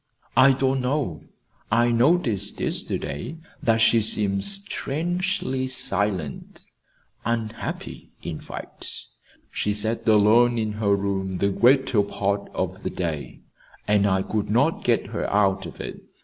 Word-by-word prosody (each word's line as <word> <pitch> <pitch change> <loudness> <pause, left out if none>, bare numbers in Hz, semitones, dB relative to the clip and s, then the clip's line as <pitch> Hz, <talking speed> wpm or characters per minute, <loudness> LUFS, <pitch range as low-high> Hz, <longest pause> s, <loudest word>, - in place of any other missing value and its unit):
"I 130 +2 +7
don't 130 0 0
know. 125 - -2 0.5
I 120 +2 +3
noticed 120 - +2
yesterday 70 - -3 0.2
that 115 -1 +2
she 115 0 +5
seemed 100 -2 +1
strangely 175 -7 -1
silent 100 - -2 0.6
unhappy, 115 -1 -4
in - - -5
fact. - - -7 0.6
She 105 0 -1
sat 110 +3 -1
alone 110 +3 +5
in 110 -1 -1
her 100 -1 +3
room 95 -2 -2
the 100 - +1
greater 125 +1 +3
part 100 0 -2
of 95 +2 -3
the - - -3
day, 80 -5 -4 0.5
and 105 -1 +3
I 95 -1 +1
could 105 -1 -2
not 135 +9 +2
get 120 -2 +2
her - - -2
out 95 -2 +2
of 80 - -12
it. - - -7
110 Hz, 130 wpm, -24 LUFS, 100-130 Hz, 0.6 s, I